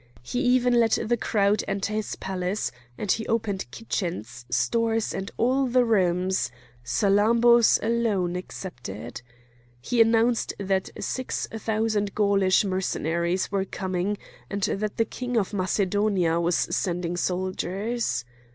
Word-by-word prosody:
He 245 Hz, -, -3 dB
even 250 Hz, -2 st, +3 dB
let 225 Hz, -1 st, +3 dB
the 240 Hz, -, +2 dB
crowd 210 Hz, -2 st, +1 dB
enter 200 Hz, +2 st, -2 dB
his 215 Hz, -1 st, -2 dB
palace, 190 Hz, +1 st, -2 dB, 0.3 s
and 205 Hz, -, -1 dB
he 225 Hz, -, -1 dB
opened 210 Hz, -4 st, -1 dB
kitchens, 125 Hz, -, -4 dB
stores, 225 Hz, -1 st, +1 dB
and 195 Hz, +1 st, -4 dB
all 260 Hz, +3 st, +2 dB
the 250 Hz, 0 st, +3 dB
rooms,—Salammbô's 190 Hz, -, +2 dB
alone 215 Hz, -6 st, +1 dB
excepted. 120 Hz, -, -7 dB, 0.6 s
He 230 Hz, -, +1 dB
announced 225 Hz, +1 st, +3 dB
that 190 Hz, -1 st, -1 dB
six 255 Hz, -1 st, -2 dB
thousand 215 Hz, -2 st, -1 dB
Gaulish 200 Hz, -2 st, +3 dB
Mercenaries 180 Hz, -1 st, -1 dB
were 195 Hz, -1 st, 0 dB
coming, 190 Hz, +1 st, -2 dB, 0.3 s
and 200 Hz, -1 st, -3 dB
that 210 Hz, +2 st, -1 dB
the 225 Hz, -, +3 dB
king 245 Hz, +1 st, -3 dB
of 205 Hz, -1 st, 0 dB
Macedonia 190 Hz, -2 st, +1 dB
was 170 Hz, 0 st, +1 dB
sending 175 Hz, -2 st, -1 dB
soldiers. 185 Hz, -, -2 dB
200 Hz, 120 wpm, -26 LUFS, 180-225 Hz, 0.6 s, even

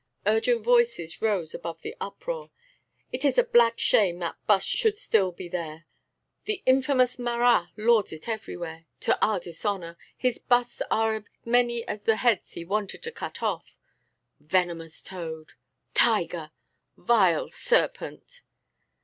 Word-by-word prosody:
Urgent 220 Hz, +2 st, +2 dB
voices 235 Hz, -8 st, +2 dB
rose 195 Hz, -8 st, 0 dB
above 165 Hz, -1 st, -7 dB
the -, -, -6 dB
uproar: 485 Hz, -, -5 dB, 0.6 s
"It 255 Hz, +2 st, -4 dB
is 285 Hz, -, +2 dB
a -, -, +6 dB
black 235 Hz, -, +4 dB
shame 185 Hz, -5 st, +3 dB
that 170 Hz, -2 st, -5 dB
bust 200 Hz, -2 st, +4 dB
should 440 Hz, -4 st, +1 dB
still 200 Hz, -, +2 dB
be 175 Hz, +1 st, -8 dB
there!" 170 Hz, -2 st, -5 dB, 0.6 s
"The 415 Hz, -2 st, -3 dB
infamous 260 Hz, -1 st, +3 dB
Marat 240 Hz, -6 st, +3 dB
lords 220 Hz, -1 st, +3 dB
it 160 Hz, +5 st, -9 dB
everywhere, 170 Hz, -7 st, -5 dB
to -, -, +1 dB
our 210 Hz, -3 st, +2 dB
dishonour! 170 Hz, 0 st, -4 dB, 0.2 s
His 250 Hz, -2 st, 0 dB
busts 245 Hz, -1 st, +1 dB
are 220 Hz, 0 st, +2 dB
as 215 Hz, -, -11 dB, 0.2 s
many 235 Hz, 0 st, +2 dB
as 210 Hz, -, -4 dB
the 220 Hz, +1 st, +3 dB
heads 230 Hz, -3 st, +1 dB
he 170 Hz, -, -7 dB
wanted 205 Hz, -, -3 dB
to 465 Hz, -, -4 dB
cut -, -, -7 dB
off." -, -, -3 dB, 0.6 s
"Venomous 165 Hz, 0 st, -1 dB
toad!" 160 Hz, -4 st, -7 dB, 0.4 s
"Tiger!" -, -, +2 dB, 0.5 s
"Vile 190 Hz, -9 st, +3 dB
serpent!" -, -, -1 dB
215 Hz, 140 wpm, -26 LUFS, 175-245 Hz, 0.6 s, a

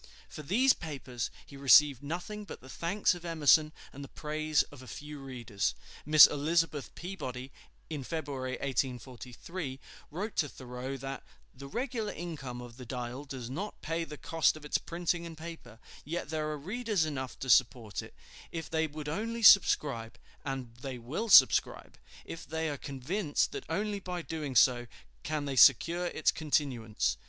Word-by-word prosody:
For -, -, -9 dB
these 240 Hz, -, +4 dB
papers 135 Hz, -7 st, -5 dB, 0.2 s
he 140 Hz, -, -13 dB
received 140 Hz, 0 st, +6 dB
nothing 175 Hz, +8 st, -5 dB
but 205 Hz, -, -9 dB
the 130 Hz, -, -14 dB
thanks 180 Hz, +9 st, +1 dB
of 175 Hz, -1 st, -9 dB
Emerson 155 Hz, -2 st, +4 dB, 0.2 s
and 140 Hz, -, -8 dB
the -, -, -8 dB
praise 155 Hz, 0 st, 0 dB
of 145 Hz, -3 st, -12 dB
a 130 Hz, -, -12 dB
few 150 Hz, +5 st, -8 dB
readers. 120 Hz, -6 st, -3 dB, 0.3 s
Miss 155 Hz, -1 st, +10 dB
Elizabeth 150 Hz, 0 st, 0 dB
Peabody, 135 Hz, -8 st, -6 dB, 0.4 s
in 150 Hz, -4 st, -5 dB
February, 135 Hz, -4 st, -4 dB
1843, 130 Hz, +3 st, -4 dB, 0.3 s
wrote 200 Hz, +8 st, -5 dB
to 145 Hz, -, +1 dB
Thoreau, 130 Hz, +1 st, -6 dB
that 135 Hz, 0 st, -6 dB, 0.3 s
"the 140 Hz, +1 st, -10 dB
regular 230 Hz, -, -3 dB
income 140 Hz, -8 st, -6 dB
of 120 Hz, -1 st, -11 dB
the 125 Hz, -, -9 dB
'Dial' 125 Hz, +2 st, -5 dB
does 130 Hz, -4 st, -6 dB
not 180 Hz, -, -5 dB
pay 165 Hz, +1 st, -1 dB
the 150 Hz, -2 st, -8 dB
cost 160 Hz, 0 st, +1 dB
of 150 Hz, -, -12 dB
its 150 Hz, -, +1 dB
printing 175 Hz, 0 st, -2 dB
and 165 Hz, -1 st, -10 dB
paper; 160 Hz, -8 st, -9 dB, 0.3 s
yet 160 Hz, 0 st, -4 dB
there 155 Hz, -1 st, -1 dB
are 150 Hz, -, -3 dB
readers 205 Hz, -, -1 dB
enough 130 Hz, -5 st, -5 dB
to 135 Hz, -, -6 dB
support 120 Hz, -4 st, +3 dB
it, -, -, -13 dB, 0.4 s
if 165 Hz, -2 st, -5 dB
they 160 Hz, 0 st, +1 dB
would 150 Hz, 0 st, -8 dB
only 225 Hz, +8 st, -3 dB
subscribe; 140 Hz, -, +5 dB, 0.3 s
and 135 Hz, -4 st, -5 dB
they 130 Hz, 0 st, -6 dB
will 140 Hz, -, -4 dB
subscribe, -, -, +6 dB, 0.3 s
if 165 Hz, -, -8 dB
they 160 Hz, 0 st, -2 dB
are -, -, -3 dB
convinced 145 Hz, +5 st, -1 dB
that -, -, -6 dB
only 205 Hz, +4 st, -1 dB
by 180 Hz, -2 st, -5 dB
doing 150 Hz, -5 st, -5 dB
so 120 Hz, +1 st, +5 dB, 0.3 s
can 150 Hz, -1 st, -2 dB
they 140 Hz, -1 st, -3 dB
secure 165 Hz, +8 st, +6 dB
its 160 Hz, -, +1 dB
continuance." 135 Hz, -8 st, 0 dB
150 Hz, 165 wpm, -31 LUFS, 130-165 Hz, 0.4 s, Miss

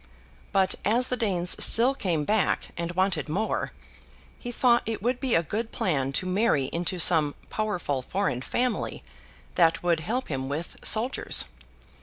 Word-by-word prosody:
But, 190 Hz, -1 st, +1 dB
as 240 Hz, +5 st, +1 dB
the 250 Hz, -, 0 dB
Danes 185 Hz, -7 st, +1 dB
still 245 Hz, +4 st, +7 dB
came 170 Hz, -, -2 dB
back 210 Hz, -2 st, 0 dB
and 170 Hz, +1 st, -4 dB
wanted 180 Hz, -4 st, -1 dB
more, 205 Hz, +8 st, -2 dB, 0.7 s
he 245 Hz, -, -6 dB
thought 240 Hz, 0 st, +2 dB
it 225 Hz, -3 st, -4 dB
would 245 Hz, +1 st, -1 dB
be 260 Hz, -4 st, 0 dB
a 165 Hz, -, +2 dB
good 220 Hz, +7 st, -4 dB
plan 135 Hz, -7 st, -1 dB
to 185 Hz, -, 0 dB
marry 185 Hz, -, 0 dB
into 175 Hz, +2 st, -2 dB
some 160 Hz, -4 st, +4 dB, 0.2 s
powerful 180 Hz, -11 st, -2 dB
foreign 185 Hz, -3 st, -2 dB
family 245 Hz, -, -3 dB, 0.5 s
that 165 Hz, -1 st, +2 dB
would 170 Hz, -2 st, +1 dB
help 235 Hz, +11 st, -3 dB
him 135 Hz, -2 st, -4 dB
with 155 Hz, +4 st, -5 dB
soldiers. 230 Hz, +5 st, +3 dB
185 Hz, 155 wpm, -26 LUFS, 160-225 Hz, 0.7 s, still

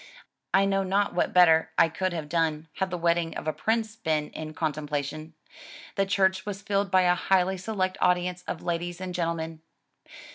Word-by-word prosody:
I 195 Hz, +1 st, +4 dB
know 195 Hz, 0 st, +1 dB
not 195 Hz, +2 st, +1 dB
what 175 Hz, -, +1 dB
better 165 Hz, -3 st, +5 dB
I -, -, +6 dB
could 185 Hz, +3 st, -2 dB
have 160 Hz, -3 st, -4 dB
done 160 Hz, -1 st, 0 dB
had 190 Hz, -1 st, 0 dB
the 180 Hz, -, -3 dB
wedding 170 Hz, -1 st, 0 dB
of -, -, -6 dB
a 155 Hz, -, +1 dB
prince 220 Hz, -1 st, -1 dB
been 155 Hz, -7 st, -1 dB
in 155 Hz, 0 st, -7 dB
contem 155 Hz, -2 st, -2 dB
plation. 150 Hz, +2 st, -4 dB, 0.6 s
The 195 Hz, 0 st, +1 dB
church 190 Hz, -1 st, +2 dB
was 205 Hz, -1 st, -6 dB
filled 200 Hz, -1 st, 0 dB
by 185 Hz, -1 st, +4 dB
a 180 Hz, 0 st, +4 dB
highly 190 Hz, +1 st, +1 dB
select 185 Hz, -1 st, -2 dB
audience 180 Hz, 0 st, +1 dB
of 160 Hz, -, -4 dB
ladies 175 Hz, 0 st, -3 dB
and 185 Hz, -1 st, -5 dB
gentlemen. 165 Hz, -2 st, -3 dB
180 Hz, 185 wpm, -27 LUFS, 160-190 Hz, 0.6 s, I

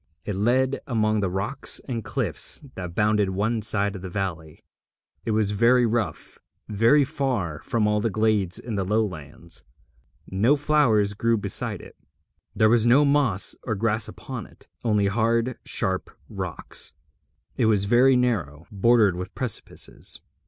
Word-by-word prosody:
It 105 Hz, -, -2 dB
led 130 Hz, +6 st, +1 dB
among 110 Hz, -4 st, +1 dB
the 100 Hz, -2 st, 0 dB
rocks 95 Hz, +9 st, -2 dB
and 120 Hz, -4 st, -3 dB
cliffs -, -, -2 dB
that 90 Hz, -2 st, -7 dB
bounded 105 Hz, -2 st, +2 dB
one 110 Hz, +4 st, -1 dB
side 100 Hz, -1 st, 0 dB
of 95 Hz, -, -7 dB
the 95 Hz, -, -6 dB
valley. 85 Hz, -5 st, -5 dB, 0.6 s
It -, -, -2 dB
was 110 Hz, -2 st, +1 dB
very 120 Hz, +4 st, +4 dB
rough, 110 Hz, -8 st, -3 dB, 0.3 s
very 115 Hz, +8 st, +4 dB
far 120 Hz, -, -2 dB
from 115 Hz, -3 st, 0 dB
all 105 Hz, 0 st, +1 dB
the 115 Hz, -, 0 dB
glades 105 Hz, -4 st, +1 dB
in 115 Hz, -, -6 dB
the 100 Hz, -2 st, -1 dB
lowlands. 90 Hz, -6 st, -3 dB, 0.6 s
No 110 Hz, +10 st, +3 dB
flowers 140 Hz, -9 st, +2 dB
grew 115 Hz, +3 st, +1 dB
beside 105 Hz, -, -2 dB
it, -, -, -14 dB, 0.6 s
there 110 Hz, +1 st, +4 dB
was 115 Hz, 0 st, +4 dB
no 125 Hz, +5 st, +5 dB
moss 140 Hz, -9 st, +2 dB
or 110 Hz, -, -2 dB
grass 110 Hz, +1 st, 0 dB
upon -, -, -7 dB
it, -, -, -20 dB, 0.2 s
only 105 Hz, -3 st, +2 dB
hard 115 Hz, +4 st, 0 dB
sharp 95 Hz, 0 st, -2 dB, 0.2 s
rocks. -, -, -5 dB, 0.6 s
It -, -, +2 dB
was 105 Hz, -3 st, +3 dB
very 125 Hz, +5 st, +5 dB
narrow, 85 Hz, -, -1 dB
bordered 105 Hz, -1 st, +3 dB
with 90 Hz, +1 st, -7 dB
precipices. 125 Hz, -6 st, -4 dB
110 Hz, 150 wpm, -24 LUFS, 100-120 Hz, 0.6 s, no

